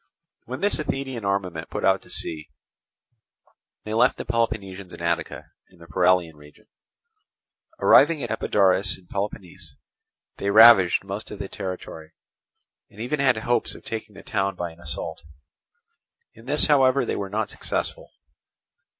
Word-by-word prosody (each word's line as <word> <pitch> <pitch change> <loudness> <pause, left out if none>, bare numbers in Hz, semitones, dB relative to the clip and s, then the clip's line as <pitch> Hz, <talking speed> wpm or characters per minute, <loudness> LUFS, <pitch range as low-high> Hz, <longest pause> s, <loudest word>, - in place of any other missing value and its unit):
When 130 +2 -6
this 205 -4 +2
Athenian 135 -5 -3
armament 95 -5 -2
put - - -3
out - - +3
to - - -19
sea, 75 -2 -2 1.3
they 110 - -5
left 115 - +3
the - - -6
Peloponnesians 100 -5 -2
in - - -8
Attica 85 0 -3 0.2
in 95 - -22
the 85 - -14
Paralian 90 -1 +2
region. 75 0 -18 1.1
Arriving 150 0 +5
at - - -4
Epidaurus 100 -3 +2
in 95 - -21
Peloponnese 95 -5 -5 0.6
they 100 - -2
ravaged 105 -5 +7
most 100 +2 -6
of 105 - -8
the 100 - -5
territory, 85 -5 -7 0.8
and 105 - -17
even 125 +6 -2
had 130 -4 +3
hopes 120 +2 0
of - - -14
taking 110 -2 -6
the 100 - -12
town 100 -4 -1
by 85 -1 -4
an 80 - -18
assault: 75 -3 -6 1.1
in 115 - -17
this 150 +2 +4
however 135 -2 +4
they - - -2
were 100 -1 -4
not 105 +1 -2
successful. - - -3
100 Hz, 150 wpm, -24 LUFS, 90-115 Hz, 1.3 s, ravaged